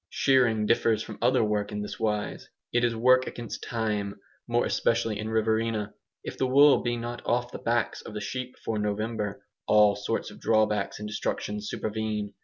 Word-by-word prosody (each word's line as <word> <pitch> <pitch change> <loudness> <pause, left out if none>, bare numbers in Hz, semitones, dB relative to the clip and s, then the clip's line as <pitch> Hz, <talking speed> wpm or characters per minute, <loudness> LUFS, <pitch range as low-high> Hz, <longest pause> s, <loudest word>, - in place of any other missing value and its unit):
Shearing 120 -5 +3
differs 115 0 +2
from - - -9
other - - +3
work 105 -1 -1
in 105 0 -3
this 105 - -7
wise: 105 -2 -2 0.2
it 120 0 +2
is 120 -1 +2
work 130 +3 +4
against 120 -2 -6
time, 105 -3 -2 0.3
more 120 0 +2
especially 115 -2 0
in 110 0 -3
Riverina. 110 -1 0 0.3
If - - -7
the 130 - +2
wool 140 +2 +6
be 120 0 -1
not 120 +1 -5
off 120 +1 0
the - - -7
backs 120 -1 0
of 105 - -10
the - - -2
sheep 125 +3 -5
before 110 -1 -3
November, 105 0 -2 0.2
all 105 -1 +5
sorts - - -3
of - - -13
draw 110 -1 +4
backs 105 -2 -2
and 105 - -6
destructions 105 0 -3
supervene. 105 -1 -3
110 Hz, 185 wpm, -27 LUFS, 105-120 Hz, 0.3 s, wool